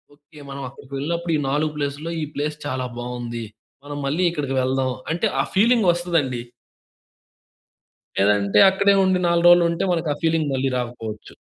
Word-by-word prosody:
Okay 145 Hz, +1 st, -18 dB
మనం 140 Hz, 0 st, -6 dB
అక్కడికి 135 Hz, +1 st, -15 dB
వెళ్ళినప్పుడు 170 Hz, +4 st, -2 dB
ఈ -, -, -2 dB
నాలుగు 150 Hz, +2 st, 0 dB
ప్లేస్‌లో 145 Hz, +3 st, -3 dB
ఈ -, -, -1 dB
ప్లేస్ 150 Hz, +1 st, -2 dB
చాలా 130 Hz, -2 st, -2 dB
బావుంది. 120 Hz, -1 st, -5 dB, 0.4 s
మనం 145 Hz, 0 st, -6 dB
మళ్ళీ 155 Hz, +7 st, 0 dB
ఇక్కడికి 140 Hz, -4 st, -3 dB
వెళ్దాం 130 Hz, 0 st, 0 dB, 0.2 s
అంటే 175 Hz, +7 st, 0 dB
ఆ -, -, 0 dB
ఫీలింగ్ 225 Hz, 0 st, +4 dB
వస్తదండి. 165 Hz, -8 st, -1 dB, 1.8 s
లేదంటే 100 Hz, 0 st, +3 dB
అక్కడే 200 Hz, +1 st, +3 dB
ఉండి 185 Hz, -1 st, +2 dB
4 170 Hz, 0 st, +3 dB
రోలు 175 Hz, 0 st, +7 dB
ఉంటే 170 Hz, +3 st, -1 dB
మనకు 165 Hz, -2 st, -1 dB
ఆ -, -, -11 dB
ఫీలింగ్ 160 Hz, -2 st, +1 dB
మళ్ళీ 135 Hz, +1 st, 0 dB
రాకపోవచ్చు. 115 Hz, -3 st, -6 dB
145 Hz, 155 wpm, -22 LUFS, 130-170 Hz, 1.8 s, రోలు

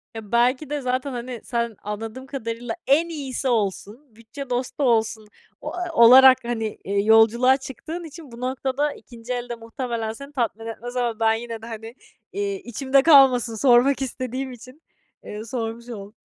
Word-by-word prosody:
Ya, 220 Hz, -2 st, -9 dB
belki 250 Hz, +5 st, +2 dB
de 295 Hz, -1 st, -2 dB
zaten, 255 Hz, +2 st, -2 dB
hani, 245 Hz, -2 st, -6 dB
sen, 235 Hz, -2 st, -2 dB
anladığım 220 Hz, +5 st, -6 dB
kadarıyla, 240 Hz, -1 st, -5 dB
"En 315 Hz, +5 st, +3 dB
iyisi 275 Hz, -4 st, -4 dB
olsun, 225 Hz, +2 st, -2 dB
bütçe 235 Hz, +5 st, -10 dB
dostu 250 Hz, +3 st, -2 dB
olsun," 225 Hz, -3 st, +1 dB, 0.3 s
o -, -, -6 dB
a 355 Hz, -1 st, -4 dB
olarak, 255 Hz, +1 st, +8 dB
hani, 225 Hz, -2 st, -3 dB
eee, 200 Hz, +1 st, 0 dB
yolculuğa 225 Hz, +4 st, +5 dB
çıktığın 310 Hz, +6 st, -7 dB
için 315 Hz, -3 st, -11 dB
bu 235 Hz, +1 st, -11 dB
noktada 265 Hz, +3 st, -1 dB
ikinci 240 Hz, 0 st, -8 dB
el 245 Hz, 0 st, -5 dB
de 240 Hz, -, -3 dB
muhtemelen 230 Hz, -1 st, -4 dB
seni 280 Hz, +5 st, -11 dB
tatmin 230 Hz, -4 st, -2 dB
etmez 240 Hz, +2 st, -7 dB
ama 240 Hz, -3 st, -1 dB
ben 225 Hz, 0 st, +3 dB
yine 230 Hz, 0 st, -5 dB
de, -, -, -9 dB
hani, 225 Hz, +1 st, -8 dB, 0.4 s
eee, 200 Hz, 0 st, -2 dB
içimde 265 Hz, +3 st, +1 dB
kalmasın 265 Hz, -7 st, +6 dB
sormak 255 Hz, +3 st, +4 dB
istediğim 260 Hz, 0 st, -4 dB
için, 255 Hz, +5 st, -13 dB, 0.4 s
eee, 210 Hz, +1 st, -7 dB
sormuş 230 Hz, 0 st, -5 dB
oldum. 205 Hz, -2 st, -9 dB
245 Hz, 165 wpm, -23 LUFS, 225-265 Hz, 0.4 s, olarak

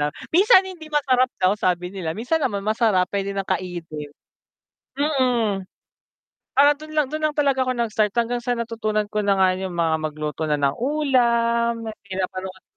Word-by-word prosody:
na 145 Hz, -, +1 dB, 0.3 s
minsan 390 Hz, +1 st, +6 dB
hindi 345 Hz, -5 st, -9 dB
masarap 260 Hz, -4 st, +2 dB
daw 185 Hz, +1 st, +3 dB
sabi 180 Hz, -2 st, -1 dB
nila, 175 Hz, -5 st, -3 dB
minsan 260 Hz, +9 st, 0 dB
naman 200 Hz, -6 st, -1 dB
masarap 215 Hz, -4 st, +2 dB
puwede 200 Hz, 0 st, -1 dB
ng 195 Hz, -, -1 dB
kainin. 165 Hz, -5 st, -4 dB, 0.9 s
Mm, 250 Hz, -9 st, +1 dB, 1.0 s
ah, 285 Hz, +1 st, +7 dB
dun 310 Hz, 0 st, -10 dB
lang 300 Hz, -3 st, +3 dB
dun 310 Hz, -, -3 dB
lang 300 Hz, -, -6 dB
talaga 275 Hz, -3 st, +2 dB
ako 255 Hz, -, 0 dB
nag-start 215 Hz, -3 st, 0 dB
hanggang 235 Hz, +1 st, +1 dB
sa 245 Hz, 0 st, -1 dB
natutunan 220 Hz, -2 st, -1 dB
ko 210 Hz, -, -1 dB
na 200 Hz, -, +4 dB
nga 190 Hz, -1 st, +4 dB
yung 190 Hz, -2 st, -5 dB
mga 165 Hz, -2 st, +1 dB
magluto 155 Hz, 0 st, -3 dB
na 150 Hz, -, +2 dB
ng 140 Hz, -1 st, +1 dB
ulam, 235 Hz, -4 st, +1 dB
mga 220 Hz, -, -5 dB
pinapanood 185 Hz, 0 st, -5 dB
220 Hz, 170 wpm, -22 LUFS, 185-260 Hz, 1.0 s, ah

